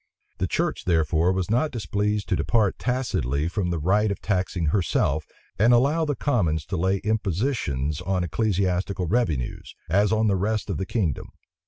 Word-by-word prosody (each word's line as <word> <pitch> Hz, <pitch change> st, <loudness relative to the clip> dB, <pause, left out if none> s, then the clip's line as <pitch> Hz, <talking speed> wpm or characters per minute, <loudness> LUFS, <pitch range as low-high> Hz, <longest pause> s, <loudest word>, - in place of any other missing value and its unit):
The -, -, 0 dB
church, -, -, -1 dB
therefore, 80 Hz, 0 st, +2 dB
was 95 Hz, +1 st, -2 dB
not 135 Hz, +7 st, +2 dB
displeased 105 Hz, -, -2 dB
to -, -, +2 dB
depart 110 Hz, -5 st, +1 dB
tacitly 85 Hz, -, -1 dB
from 90 Hz, +1 st, -2 dB
the 85 Hz, -, -1 dB
right 100 Hz, +7 st, +2 dB
of 100 Hz, -, -3 dB
taxing 90 Hz, -4 st, -1 dB
herself, 80 Hz, -5 st, +1 dB, 0.3 s
and 115 Hz, +4 st, +5 dB
allow 145 Hz, +7 st, +2 dB
the 145 Hz, -2 st, -1 dB
commons 85 Hz, -, 0 dB
to -, -, -2 dB
lay 95 Hz, +3 st, +1 dB
impositions 95 Hz, -, -1 dB
on 95 Hz, -2 st, -1 dB
ecclesiastical 95 Hz, +1 st, 0 dB
revenues, 85 Hz, -, -1 dB
as 100 Hz, +5 st, +3 dB
on 110 Hz, 0 st, +2 dB
the 100 Hz, -2 st, +3 dB
rest 105 Hz, +2 st, -1 dB
of -, -, -2 dB
the 95 Hz, -, -3 dB
kingdom. 90 Hz, -, -1 dB
95 Hz, 165 wpm, -25 LUFS, 85-110 Hz, 0.3 s, and